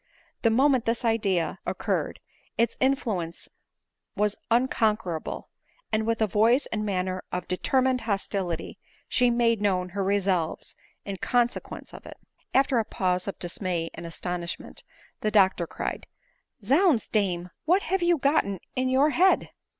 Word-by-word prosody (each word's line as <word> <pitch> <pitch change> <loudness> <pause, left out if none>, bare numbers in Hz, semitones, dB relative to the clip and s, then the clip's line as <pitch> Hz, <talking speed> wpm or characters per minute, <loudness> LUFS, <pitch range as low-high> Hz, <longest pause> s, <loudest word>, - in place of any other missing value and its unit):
The 230 - +4
moment 260 +1 +3
this 230 +1 -1
idea 200 -7 +1
occurred, - - -2 0.4
its 230 0 +2
influence 220 - -1 0.7
was 210 0 +1
unconquerable; 220 -8 0 0.4
and 220 0 0
with 230 -1 +1
a - - +5
voice 225 +7 +3
and 215 -1 -1
manner 185 -2 -2
of 180 - -3
determined 255 +7 +1
hostility, 195 -5 -3 0.3
she 250 -1 +3
made 235 -2 +2
known 185 -3 +1
her 195 +2 -2
resolves 190 -4 0 0.3
in 200 -1 -4
consequence 240 +4 -1
of - - -11
it. - - -10 0.3
After 265 -2 +3
a - - +2
pause 180 -2 -1
of 200 - -4
dismay 175 -1 -3
and 170 - -7
astonishment 175 +1 -5 0.4
the 215 - 0
doctor 190 -5 +3
cried, - - -5 0.3
" - - -37
Zounds, 280 - +3
dame, 180 -4 0
what 360 +5 +3
have 380 +2 0
you 345 -1 +3
gotten 270 - +1 0.2
in 255 0 +1
your 275 +4 +4
head 370 +5 +3
215 Hz, 140 wpm, -26 LUFS, 185-250 Hz, 0.7 s, a